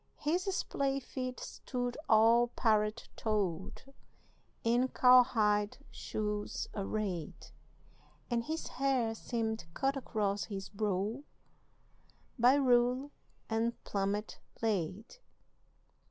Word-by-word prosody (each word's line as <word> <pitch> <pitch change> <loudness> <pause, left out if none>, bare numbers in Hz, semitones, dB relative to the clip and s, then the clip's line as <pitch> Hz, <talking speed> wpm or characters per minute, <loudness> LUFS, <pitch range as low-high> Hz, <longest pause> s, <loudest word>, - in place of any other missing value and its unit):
His 340 +5 0
splay 275 -4 -1
feet 255 -1 -5
stood 245 -1 -4
all 230 +2 +6
parrot 215 -2 +1
toed 195 -5 -2 0.8
In 240 +3 +3
cowhide 225 -6 +4
shoes 210 -1 -3
arrayed, 195 -5 -4 0.8
And 235 -1 -1
his 320 +1 -3
hair 255 -4 0
seemed 225 -1 -3
cut 270 +1 +1
across 210 -6 -1
his 195 -3 -6
brow 210 +3 -1 1.2
By 245 +3 +6
rule 255 +1 +3 0.4
and 230 +1 -1
plummet 200 +1 -2 0.2
laid. 210 - -2
225 Hz, 90 wpm, -33 LUFS, 210-250 Hz, 1.2 s, all